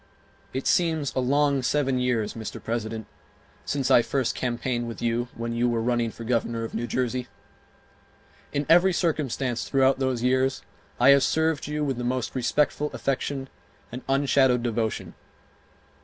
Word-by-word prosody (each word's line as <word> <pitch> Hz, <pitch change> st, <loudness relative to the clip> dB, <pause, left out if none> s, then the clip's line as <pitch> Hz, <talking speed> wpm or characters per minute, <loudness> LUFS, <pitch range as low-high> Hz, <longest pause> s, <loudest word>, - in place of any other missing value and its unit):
It 130 Hz, -, -4 dB
seems 160 Hz, -5 st, +1 dB
a -, -, 0 dB
long 140 Hz, +2 st, +2 dB
seven 135 Hz, -1 st, +1 dB
years, 120 Hz, -4 st, 0 dB
Mr. 110 Hz, -2 st, -6 dB
President, 110 Hz, -1 st, -3 dB, 0.6 s
since 135 Hz, -2 st, -1 dB
I 120 Hz, -, +7 dB
first 130 Hz, 0 st, -1 dB
campaigned 120 Hz, -1 st, -2 dB
with 115 Hz, -, -7 dB
you 120 Hz, +1 st, 0 dB
when 115 Hz, 0 st, -4 dB
you 120 Hz, +1 st, +1 dB
were 120 Hz, -1 st, 0 dB
running 120 Hz, 0 st, 0 dB
for 115 Hz, -, -9 dB
Governor 115 Hz, -1 st, -1 dB
of 115 Hz, -, -6 dB
New 120 Hz, +2 st, -2 dB
Jersey. 125 Hz, 0 st, -1 dB, 1.2 s
In 145 Hz, 0 st, -1 dB
every 175 Hz, +3 st, +5 dB
circumstance 140 Hz, -8 st, -1 dB
throughout 135 Hz, -1 st, +3 dB
those 130 Hz, -3 st, -1 dB
years 130 Hz, +1 st, +1 dB, 0.4 s
I 125 Hz, +3 st, +6 dB
have 140 Hz, 0 st, +7 dB
served 160 Hz, +1 st, +1 dB
you 150 Hz, 0 st, -2 dB
with 135 Hz, -4 st, -1 dB
the 125 Hz, -, -3 dB
most 125 Hz, 0 st, -2 dB
respectful 145 Hz, +3 st, +1 dB
affection 135 Hz, 0 st, -2 dB, 0.4 s
and 125 Hz, +2 st, -6 dB
unshadowed 135 Hz, -3 st, +3 dB
devotion. 115 Hz, -2 st, -2 dB
130 Hz, 155 wpm, -26 LUFS, 120-140 Hz, 1.2 s, I